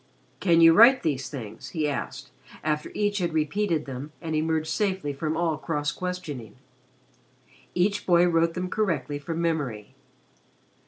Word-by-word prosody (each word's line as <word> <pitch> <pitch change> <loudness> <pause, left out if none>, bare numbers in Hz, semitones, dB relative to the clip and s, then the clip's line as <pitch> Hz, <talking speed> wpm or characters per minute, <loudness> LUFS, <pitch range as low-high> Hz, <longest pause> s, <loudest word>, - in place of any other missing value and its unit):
"Can 170 -3 +4
you 165 0 +8
write 235 +7 +7
these 140 -4 -1
things?" 115 -6 -8
he 155 -1 +1
asked, 145 - -5 0.3
after 150 -1 -1
each 205 -1 0
had 170 -3 -1
repeated 160 +1 0
them 135 +3 -7
and 160 -2 -3
emerged 160 0 0
safely 190 -7 -1
from 155 +3 -2
all 165 -3 0
cross 150 -2 -2
questioning. 170 - -6 1.2
Each 200 +3 +1
boy 175 -1 +5
wrote 165 -1 +2
them 180 0 -2
correctly 155 -9 -1
from 165 +3 -4
memory. 140 -11 -2
160 Hz, 145 wpm, -26 LUFS, 145-180 Hz, 1.2 s, you